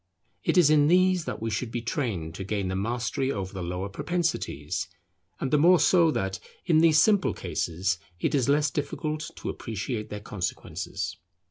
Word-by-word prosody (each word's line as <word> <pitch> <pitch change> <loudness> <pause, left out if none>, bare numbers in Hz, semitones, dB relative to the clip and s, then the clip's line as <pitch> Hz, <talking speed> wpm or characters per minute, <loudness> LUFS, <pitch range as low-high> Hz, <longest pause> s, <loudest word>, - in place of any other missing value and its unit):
It - - +1
is 160 -4 +6
in 145 -1 +5
these 185 0 +4
that - - -5
we 115 - -1
should 120 +2 -2
be 120 0 -4
trained 110 - -2
to 95 - -6
gain 100 -1 -2
the 95 - -2
mastery 120 +6 -1
over 95 -5 -4
the 95 - -5
lower 90 +2 -3
propensities; 170 - -2 0.5
and 135 - -2
the 150 - +4
more 175 +3 +6
so 170 -3 +5
that, 95 - -2 0.3
in 160 -3 +4
these 160 -1 +6
simple 205 +2 +3
cases, 90 +3 -1 0.2
it - - 0
is 135 -3 +2
less 145 0 +3
difficult 155 +1 -3
to - - -5
appreciate 110 0 -4
their 105 - -5
consequences. 100 -3 -4
125 Hz, 175 wpm, -27 LUFS, 100-155 Hz, 0.5 s, is